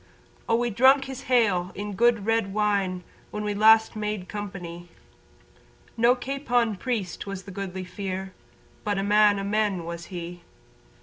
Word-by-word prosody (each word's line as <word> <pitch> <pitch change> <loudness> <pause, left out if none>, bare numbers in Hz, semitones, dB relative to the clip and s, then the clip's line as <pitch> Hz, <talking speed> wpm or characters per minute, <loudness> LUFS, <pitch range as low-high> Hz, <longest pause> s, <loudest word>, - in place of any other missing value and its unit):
Oh 230 - +4
we 240 0 0
drunk 265 +5 +5
his 270 0 -8
"Hale" 200 -8 +3
in 205 +1 -4
the - - -7
good 230 -1 +3
red 225 -3 +1
wine 200 -4 0 0.3
When 210 - -5
we 210 0 -1
last 220 +2 +5
made 210 -3 -3
company, 175 -4 -7 1.1
No 240 +2 +4
capon 245 -4 0
priest 205 -4 -3
was 195 -1 -5
the 195 - -10
Goodly 190 -1 -5
Fere 190 0 -5 0.5
But 205 -1 -1
a 195 - 0
man 205 0 +4
o' 195 - -3
men 200 -3 0
was 170 0 -6
he. 175 -1 -7
205 Hz, 160 wpm, -26 LUFS, 185-225 Hz, 1.1 s, drunk